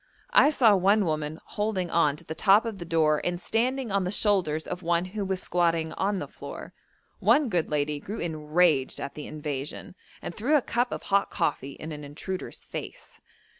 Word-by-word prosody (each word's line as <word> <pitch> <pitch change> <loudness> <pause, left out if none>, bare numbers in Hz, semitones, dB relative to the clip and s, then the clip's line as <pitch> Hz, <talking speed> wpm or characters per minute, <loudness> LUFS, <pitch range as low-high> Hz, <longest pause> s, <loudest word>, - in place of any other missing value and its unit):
I - - +7
saw 235 -8 +5
one 200 +2 +3
woman 155 -1 -2
holding 200 -5 -2
on 150 -4 +3
to - - -13
the 160 - -6
top 200 +6 +4
of 220 -4 -4
the 170 - -6
door 160 -2 +2
and 175 0 -1
standing 240 +4 0
on 200 -1 +2
the 180 - -1
shoulders 185 -7 +1
of 180 0 -5
one 170 0 +1
who 200 +3 -4
was 190 -1 -2
squatting 165 -2 +1
on 200 +1 0
the - - -4
floor. - - -9 0.5
One 290 -4 +4
good 175 -5 0
lady 150 0 0
grew 205 +8 -6
enraged 155 -2 +1
at 140 - -5
the 150 - -7
invasion, 150 -1 -5 0.3
and - - -6
threw 255 - +1
a 295 - +5
cup 245 +1 0
of - - -4
hot 200 0 +2
coffee 140 -1 -1
in 160 +3 -8
an 150 -1 -7
intruder's 160 +6 -6
face. - - -8
175 Hz, 195 wpm, -27 LUFS, 155-205 Hz, 0.5 s, I